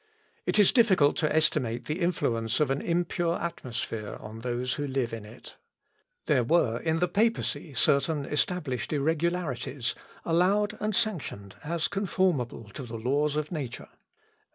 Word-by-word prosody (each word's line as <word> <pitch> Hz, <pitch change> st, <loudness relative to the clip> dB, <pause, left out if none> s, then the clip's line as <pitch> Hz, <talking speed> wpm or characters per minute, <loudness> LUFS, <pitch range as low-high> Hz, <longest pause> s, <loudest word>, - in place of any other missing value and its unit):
It -, -, +2 dB
is 205 Hz, -3 st, +6 dB
difficult 190 Hz, -, +4 dB
to 155 Hz, -, +1 dB
estimate 145 Hz, -7 st, +1 dB
the 155 Hz, +4 st, -2 dB
influence 115 Hz, -9 st, 0 dB
of 150 Hz, -3 st, +2 dB
an 135 Hz, -, 0 dB
impure 170 Hz, 0 st, 0 dB
atmosphere 115 Hz, -9 st, -4 dB
on 110 Hz, +1 st, -9 dB
those 125 Hz, +1 st, -2 dB
who 145 Hz, -1 st, -3 dB
live 130 Hz, -4 st, -1 dB
in 110 Hz, -2 st, -5 dB
it. 110 Hz, +4 st, -12 dB, 0.7 s
There 140 Hz, -6 st, +3 dB
were 120 Hz, -4 st, +2 dB
in 160 Hz, 0 st, 0 dB
the 180 Hz, +2 st, +2 dB
papacy 200 Hz, -, 0 dB
certain 140 Hz, +4 st, +2 dB
established 150 Hz, -, -1 dB
irregularities, 150 Hz, -4 st, -1 dB, 0.3 s
allowed 195 Hz, +5 st, +2 dB
and 215 Hz, -1 st, -1 dB
sanctioned 170 Hz, -, -2 dB
as 165 Hz, +1 st, 0 dB
conformable 180 Hz, -, -1 dB
to -, -, -6 dB
the 120 Hz, -3 st, -6 dB
laws 140 Hz, +6 st, +1 dB
of 150 Hz, 0 st, -2 dB
nature. 140 Hz, -8 st, -5 dB
150 Hz, 145 wpm, -28 LUFS, 125-175 Hz, 0.7 s, is